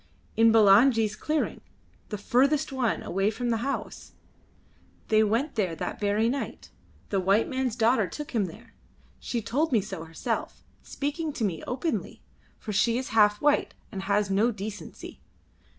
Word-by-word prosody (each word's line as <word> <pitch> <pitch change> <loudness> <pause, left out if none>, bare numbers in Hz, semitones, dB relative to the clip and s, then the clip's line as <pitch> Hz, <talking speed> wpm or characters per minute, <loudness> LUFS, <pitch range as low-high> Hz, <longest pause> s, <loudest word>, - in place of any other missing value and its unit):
"In 225 0 +5
Bulangi's 220 +1 +5
clearing 305 +6 -2 0.5
the 210 - -3
furthest 275 +9 +2
one, 255 -4 -1
away 195 +3 0
from 240 +2 -2
the 225 - +1
house. 270 +5 -5 1.0
They 215 0 +5
went 230 +8 0
there 190 -7 -1
that - - -5
very 210 +2 +1
night. 270 +3 -4 0.4
The 195 - +1
white 195 +4 +2
man's 260 -3 -2
daughter 230 -2 +3
took 295 +7 -7
him 220 -5 +1
there. 165 - -12 0.5
She 235 -3 -3
told 295 +9 0
me 230 - +4
so 190 -4 -6
herself, 160 0 -4 0.2
speaking 300 +3 -3
to 235 - -3
me 180 -6 -1
openly, 270 +6 -3 0.3
for 210 - -6
she 230 +4 +2
is 260 - -4
half 210 -2 +4
white 295 0 +2 0.2
and 195 -3 -5
has 200 +1 0
no 210 +5 +3
decency. 210 -1 -8
225 Hz, 155 wpm, -27 LUFS, 205-260 Hz, 1.0 s, In